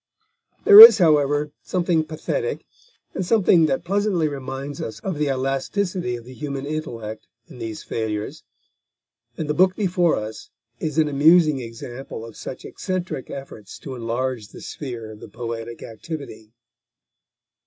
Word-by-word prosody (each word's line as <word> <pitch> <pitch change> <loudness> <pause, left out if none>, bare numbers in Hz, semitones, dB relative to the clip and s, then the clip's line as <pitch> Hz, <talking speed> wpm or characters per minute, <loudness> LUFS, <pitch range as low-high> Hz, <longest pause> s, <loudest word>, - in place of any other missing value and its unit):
There 415 -1 +10
is, 455 +2 +13
however, 150 -4 +2
something 175 -3 0
pathetic, 450 - -4 0.5
and 190 - -2
something 180 -4 +4
that 135 - -1
pleasantly 195 -3 0
reminds 135 0 -6
us 110 - -6
of 185 -6 -4
the 150 - +1
elasticity 135 +4 -2
of 120 -1 -10
the 130 - -11
human 140 0 -5
intellect 120 -8 -6 0.2
in - - -13
these 110 -2 -6
failures; 110 +5 -4 0.9
and 155 - -3
the 150 - 0
book 185 +3 +3
before 180 -4 +1
us 110 0 -7 0.3
is 155 -1 -4
an 155 -1 +3
amusing 155 +1 +4
example 115 +1 -8
of 115 - -12
such 130 - -8
eccentric 185 -8 -4
efforts 125 -7 -9
to 135 - -8
enlarge 120 -1 -3
the - - -13
sphere 120 -6 -7
of 105 - -12
the - - -11
poetic 115 +1 -6
activity. 115 -3 -8
140 Hz, 145 wpm, -22 LUFS, 115-170 Hz, 0.9 s, is